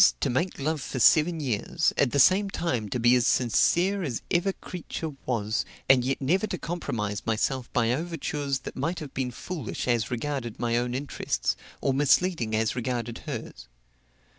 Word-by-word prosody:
to - - 0
make 170 +9 -1
love 155 +1 -1
for 135 - -5
seven 160 +6 +5
years, 140 +4 0
at 140 - +3
the 140 - -1
same 190 +8 +5
time 125 - -2
to 125 - -2
be 120 +1 +5
as 120 -2 +3
sincere 175 - +3
as 135 -10 -3
ever 175 +3 +2
creature 165 -4 -6 0.2
was, 110 -3 0 0.2
and 130 -2 +6
yet 135 +2 -1
never 180 +10 +1
to 185 - -3
compromise 110 -14 -3
myself 120 +3 -1
by 120 -2 +2
overtures 145 -3 -2
that - - -7
might 165 +7 -2
have 150 -4 -7
been 130 -2 -1
foolish 140 - -5
as 120 -2 +1
regarded 125 -2 -3
my 120 -1 0
own 120 +1 0
interests, 140 +2 -1 0.3
or 135 - +1
misleading 140 -3 +2
as 110 0 +1
regarded 120 -1 -3
hers. - - -6
135 Hz, 170 wpm, -27 LUFS, 120-165 Hz, 0.3 s, and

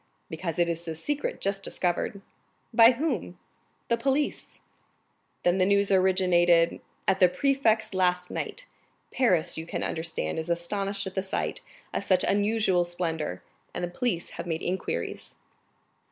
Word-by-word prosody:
"Because 165 0 -4
it 175 -1 +3
is 170 0 -3
a 160 - -3
secret 290 - -2
just 195 0 -1
discovered." 190 +2 -2 0.5
"By 230 +2 +8
whom?" 240 - -2 0.5
"The 235 - +2
police." 275 +4 -1 0.8
"Then 175 +2 +3
the 185 - +4
news 200 0 +3
originated——" 180 -3 +4 0.3
"At 190 0 +3
the 180 -2 +6
prefect's 230 -3 +1
last 180 -1 +1
night. - - -4 0.5
Paris, 180 -11 +2
you 160 - -7
can - - -3
understand, 160 - -2
is 160 +1 -5
astonished 195 +4 -1
at 190 - -5
the 190 - 0
sight 190 - -2 0.3
of - - -1
such 185 -2 +3
unusual 205 -3 +2
splendor, 165 - -3 0.3
and - - -2
the 175 - -1
police 215 -5 -2
have - - -7
made 165 0 -2
inquiries." 175 - -3
185 Hz, 145 wpm, -27 LUFS, 170-205 Hz, 0.8 s, By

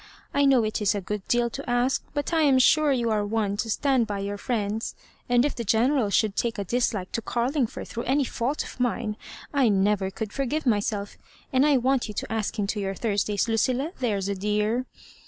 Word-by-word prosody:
I 285 0 +3
know 265 -4 +5
it 215 0 -2
is 210 0 +2
a - - 0
good 205 +1 -5
deal 240 -1 +2
to 275 +1 -6
ask; 245 +2 +1
but 290 +3 -2
I 325 - +3
am 280 -4 +5
sure 300 +3 +5
you 240 -4 +1
are 210 -1 +1
one 205 -1 -1
to 225 - -2
stand 260 0 +2
by 205 -2 -3
your 200 +1 -4
friends; 220 -3 -2 0.3
and 245 +1 +4
if 295 - 0
the 235 - -4
General 230 +2 +2
should 205 0 +2
take 235 -1 -1
a 200 - -2
dislike 210 -3 -1
to 230 - -2
Carlingford 245 +2 -1
through 235 - -5
any 275 +3 +2
fault 260 +3 -2
of - - -11
mine, 235 -3 -1 0.4
I 270 -5 +4
never 200 -1 +2
could 210 +2 -6
forgive 280 +3 -1
myself; 205 -3 -1 0.3
and 260 +3 +4
I 290 -2 +5
want 260 0 +1
yott 210 - -7
to 225 - -3
ask 220 0 -2
him 205 - 0
to 205 +1 -2
your 195 -1 -2
Thursdays, 205 0 0
Lucilla 255 +7 +1
— - - -25
there's 205 -6 -1
a 200 - 0
dear." 210 +5 0
230 Hz, 220 wpm, -26 LUFS, 205-260 Hz, 0.4 s, know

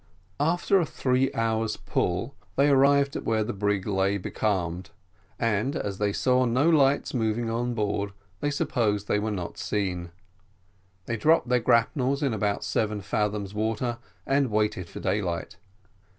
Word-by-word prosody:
After 175 +6 +2
a 170 - +1
three 130 0 +1
hours' 110 -1 0
pull, 95 +10 -1 0.2
they 140 +2 +4
arrived 140 0 +4
to - - -2
where 110 -1 0
the - - -3
brig 100 -1 0
lay 100 -1 +1
becalmed, 90 -3 -2 0.5
and 115 +5 0
as 100 -9 -3
they 105 -1 +1
saw 125 +4 +2
no 125 +6 +2
lights 145 -4 +3
moving 115 -1 0
on 120 +1 -1
board, 100 -2 -1 0.3
they 145 - 0
supposed 120 -9 0
they 105 - +2
were 110 +1 -2
not 90 -5 -5
seen. 90 -4 -2 1.0
They 115 - -2
dropped 155 0 +3
their 125 0 +4
grapnels 130 +5 +2
in 135 -5 +1
about 105 -1 -1
seven 105 -2 -1
fathoms 105 0 -2
water 115 +3 -1 0.3
and 135 -1 +2
waited 105 -5 0
for - - -8
daylight. 90 -5 -2
110 Hz, 150 wpm, -26 LUFS, 100-130 Hz, 1.0 s, they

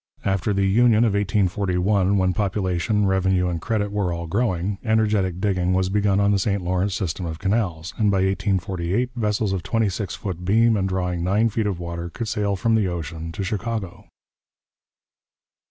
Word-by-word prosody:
After 95 +1 0
the 100 -1 +1
Union 115 +3 +4
of 110 -4 +2
1841, 100 -1 +1
when 95 -1 +2
population, 100 +1 0
revenue, 95 -1 +2
and 85 -2 -3
credit 105 -1 -1
were 100 -4 -1
all 85 0 -4
growing, 95 0 -1
energetic 105 -5 +1
digging 95 -2 +1
was 95 0 +1
begun 100 0 +2
on 100 0 +3
the 100 - +2
St 100 -1 0
Lawrence 90 +2 0
system 90 -2 -3
of 80 -1 -5
canals, 95 -4 -1
and 105 -2 +3
by 95 -1 +2
1848 95 +3 -1
vessels 105 -3 0
of 95 - -2
twenty 115 0 0
six 95 +1 -4
foot 90 -3 -5
beam 110 +4 +3
and 95 -2 0
drawing 90 -2 -2
nine 105 +5 +2
feet 110 0 -1
of 95 -4 -2
water 85 0 -5
could 115 +6 -5
sail 100 -1 0
from 115 +4 +1
the 110 -3 +2
ocean 80 -1 -5
to 100 - -4
Chicago. 105 -2 -4
95 Hz, 175 wpm, -23 LUFS, 90-105 Hz, -, Union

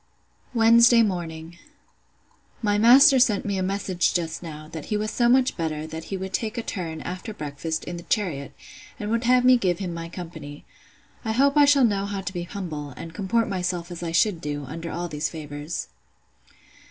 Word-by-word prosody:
Wednesday 235 +1 +6
morning. 170 -4 -4 1.0
My 205 -1 +2
master 265 +5 +7
sent 225 -5 +3
me 200 -2 -1
a - - -1
message 185 -1 0
just 165 -2 -2
now, 155 -3 -8
that 160 -2 -7
he 210 - -1
was 215 +1 -2
so 240 0 +2
much 255 +1 +3
better, 155 -2 -3
that 160 +1 -7
he 195 - -4
would 190 0 -6
take 220 +3 -2
a 235 - -2
turn, 165 -7 -5
after 185 +4 -6
breakfast, 155 0 -4
in 175 - -6
the - - -7
chariot, 160 - -1 0.5
and 210 +1 -3
would 230 +1 0
have 250 0 +4
me 255 0 +7
give 180 -6 0
him 180 -3 -4
my 165 0 -6
company. 160 -5 -9 0.6
I 220 -2 -1
hope 275 +4 +3
I 295 -1 +7
shall 280 -2 +5
know 200 -3 0
how 200 -1 -3
to 185 0 -5
be 175 - -3
humble, 160 -7 -6
and 165 - -8
comport 215 +5 0
myself 180 -2 -3
as 175 - -7
I 170 -1 -3
should 170 +1 +2
do, 145 -1 -4
under 165 +5 -6
all 175 +1 -3
these 150 -1 -2
favours. 150 0 -6
180 Hz, 195 wpm, -24 LUFS, 160-220 Hz, 1.0 s, master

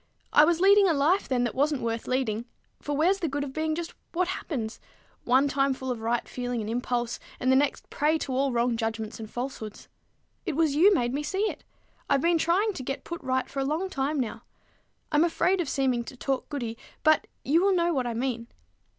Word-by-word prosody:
I 295 - +8
was 340 +1 +2
leading 400 +1 +6
a 325 - +2
life 315 +8 +2
then 250 -2 +1
that 240 - -1
wasn't 285 -1 +1
worth 230 0 -2
leading; 240 -3 -1 0.4
for 290 -1 -2
where's 365 +6 +3
the 335 - -1
good 285 0 -2
of 270 -2 -6
being 315 +1 -1
just 340 0 -5 0.2
what 360 +1 +1
happens, 240 -11 -4 0.5
one 260 +3 +4
time 275 -1 +1
full 260 0 -4
of 235 -3 -4
right 230 +1 -1
feeling 245 -1 -3
and 215 - -4
impulse, 240 0 -1 0.2
and 255 - +2
the - - +5
next 280 +1 +1
a - - -38
prey 305 +2 +2
to 275 -4 -4
all 270 +1 +1
wrong 240 0 +1
judgments 225 -1 -3
and 220 -1 -7
falsehoods? 240 -4 -6 0.5
It 310 - -3
was 315 -2 +2
you 350 +8 +6
made 245 -10 +1
me 285 - -1
see 380 +7 -1
it. - - -13 0.5
I've - - +4
been 335 +1 +3
trying 390 +7 +2
to 275 - -6
get 270 +2 -4
put 340 0 -6
right 260 -1 0
for 275 - -5
a - - +1
long 320 +7 -1
time 280 0 -1
now. 235 -4 -3 0.7
I'm 300 +1 +4
afraid 355 +2 +2
of 315 - -3
seeming 260 -3 +1
to 260 - -10
talk 270 0 -2
goody, 235 -6 -4 0.2
but 310 0 +4 0.2
you 320 +5 +4
will 390 0 +3
know 340 -1 +2
what 260 -4 0
I 235 - -3
mean. 235 -1 -2
275 Hz, 225 wpm, -27 LUFS, 245-320 Hz, 0.7 s, I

